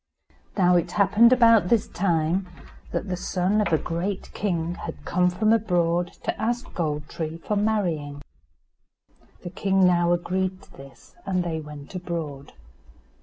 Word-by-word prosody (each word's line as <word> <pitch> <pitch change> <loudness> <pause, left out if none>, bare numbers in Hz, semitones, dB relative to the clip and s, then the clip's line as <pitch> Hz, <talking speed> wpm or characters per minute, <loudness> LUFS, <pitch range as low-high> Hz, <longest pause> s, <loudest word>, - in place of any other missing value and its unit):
Now 180 -2 +5
it 170 - -2
happened 210 +4 +5
about 230 -6 +5
this 230 -1 +2
time 175 0 0 0.4
that - - -3
the 185 - -2
son 185 +3 0
of 210 - -1
a 160 - +4
great 180 +5 -4
king 175 -4 -1
had - - -8
come 180 0 +2
from 215 +5 +2
abroad 175 -5 +1
to - - -3
ask 240 +2 -2
Gold 150 -3 -2
tree 160 0 -5
for 210 +5 -3
marrying. 170 -9 -1 1.2
The 175 - -6
king 195 0 +2
now 175 -1 +3
agreed 185 +2 -1
to - - -19
this, 135 0 -15
and 185 -2 0
they 165 -2 -3
went 150 -1 -10
abroad. 165 -6 -5
180 Hz, 150 wpm, -25 LUFS, 165-200 Hz, 1.2 s, Now